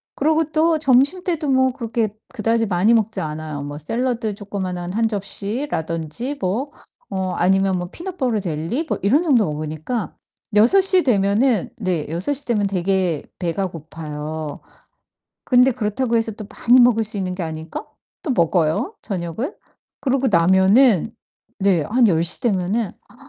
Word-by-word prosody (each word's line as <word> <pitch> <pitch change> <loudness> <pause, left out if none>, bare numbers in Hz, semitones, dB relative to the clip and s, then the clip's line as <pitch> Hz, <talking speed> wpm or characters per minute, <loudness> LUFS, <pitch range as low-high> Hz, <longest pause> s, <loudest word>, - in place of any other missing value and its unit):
그러고 315 +2 +1
또 320 +1 +2
점심 285 +5 +3
때도 325 -6 -2
뭐 260 -1 +3
그렇게 230 -3 -2 0.2
그다지 225 +1 0
많이 195 +4 +2
먹지 220 -1 0
않아요. 155 -1 -5
뭐 145 0 -6
샐러드 230 - -2
조그마한 185 -3 -5
1 225 +2 +1
접시라든지 200 - -2
뭐 230 +11 -2 0.4
어 190 -2 -2
아니면 190 +1 +2
뭐 175 0 -5
peanut 370 - -8
butter 240 -6 0
jelly 175 - -3
뭐 - - -1
이런 275 - +3
정도 255 - +3
먹으니까 155 +7 -4 0.4
6 240 - +6
시 375 -1 +5
되면은 215 -1 +2
네 180 -8 -2
6 175 - +1
시 285 +1 +5
되면 210 -4 0
되게 185 -4 0 0.2
배가 185 +2 -1
고파요. 155 -2 -7 0.9
근데 250 0 +5
그렇다고 235 0 -1
해서 225 0 0
또 210 -1 -9
많이 245 +2 +3
먹을 240 -2 +4
수 215 0 +3
있는 185 -2 -3
게 180 - -4
아니니까 160 0 -6 0.4
또 285 - -1
먹어요 170 - +1
저녁을. 195 - -4 0.5
그러고 270 -1 +1
나면은 190 - +4 0.5
네 190 -5 +2
한 235 - +3
10 165 -4 +2
시 170 - +3
되면은 205 0 0 0.2
아 - - -21
205 Hz, 315 characters per minute, -20 LUFS, 175-250 Hz, 0.9 s, 6